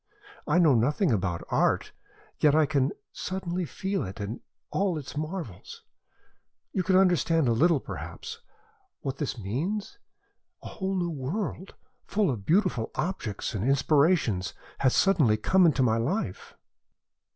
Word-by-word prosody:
I - - +3
know 165 -5 +6
nothing 145 - +2
about 90 -5 -1
art, - - +1 0.5
yet 150 -1 +4
I 155 -1 +5
can 140 -2 +1 0.2
suddenly 185 -1 -3
feel 195 +4 -2
it 95 +3 -7
and 105 +4 -4 0.3
all 190 -4 0
its 145 -2 -7
marvels. 155 - -6 0.9
You 190 - +1
can 185 +1 +2
understand 170 -5 +3
a - - +3
little, 160 +5 +4
perhaps, 460 - -7 0.6
what 135 -1 -4
this 140 -3 -3
means? 175 - -3 0.6
A - - -7
whole 190 -1 -3
new 175 -2 -1
world, 175 +7 -4 0.3
full 200 -6 +1
of 105 -6 -6
beautiful 175 - +2
objects 145 - -3
and 105 -2 -2
inspirations, 140 - +2 0.2
has 130 -2 +3
suddenly 155 - +4
come 185 - +4
into 145 -4 +2
my 115 -2 +3
life." 115 - -3
155 Hz, 140 wpm, -27 LUFS, 120-185 Hz, 0.9 s, know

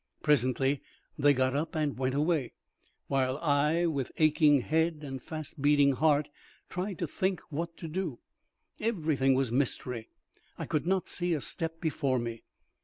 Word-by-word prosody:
Presently 135 -1 +2 0.3
they 145 0 +4
got 130 -1 +1
up 160 +3 -2
and 150 -3 0
went 130 +1 -1
away, 150 -2 +1 0.5
while 135 -1 0
I, 150 +2 +2
with 140 -6 -1
aching 150 -2 +5
head 160 +2 0
and 135 -2 -6
fast 155 -1 -6
beating 145 -1 +5
heart, 145 +1 +2 0.4
tried 185 0 -3
to 170 - -2
think 185 +4 -1
what 165 +3 -4
to 165 - -6
do. 165 -5 -3 0.6
Everything 155 - +1
was 130 -3 +1
mystery. 125 -3 -1 0.5
I - - -4
could 155 +1 -1
not 190 0 +1
see 175 -1 0
a - - -2
step 165 +2 -4
before 145 -5 0
me. 115 -1 -4
150 Hz, 155 wpm, -30 LUFS, 135-165 Hz, 0.6 s, aching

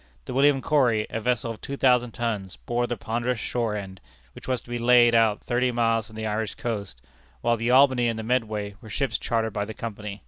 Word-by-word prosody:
The - - -6
William 135 0 +3
Corry, 120 -8 +2
a 115 - -3
vessel 120 -1 0
of 110 - -9
two 140 - -5
thousand 125 -3 +3
tons, 105 -6 -3
bore 120 0 0
the 120 - -3
ponderous 120 +3 -2
shore 115 -1 -2
end, 95 -2 -7 0.3
which - - -12
was 130 -1 0
to - - -18
be 120 - -2
laid 120 0 +5
out 110 -2 +3
thirty 125 +1 +1
miles 115 -2 +1
from 110 - -15
the 110 0 -4
Irish 110 0 -2
coast, 100 - -5 0.4
while 120 0 +2
the 115 +1 -2
Albany 130 -2 +5
and 115 -1 -1
the 110 - -4
Medway 110 -4 -1
were 110 - -12
ships 135 +5 -1
chartered 110 -2 -1
by 100 - -1
the 110 +1 -8
Company. 105 -2 -6
115 Hz, 220 wpm, -25 LUFS, 110-125 Hz, 0.4 s, laid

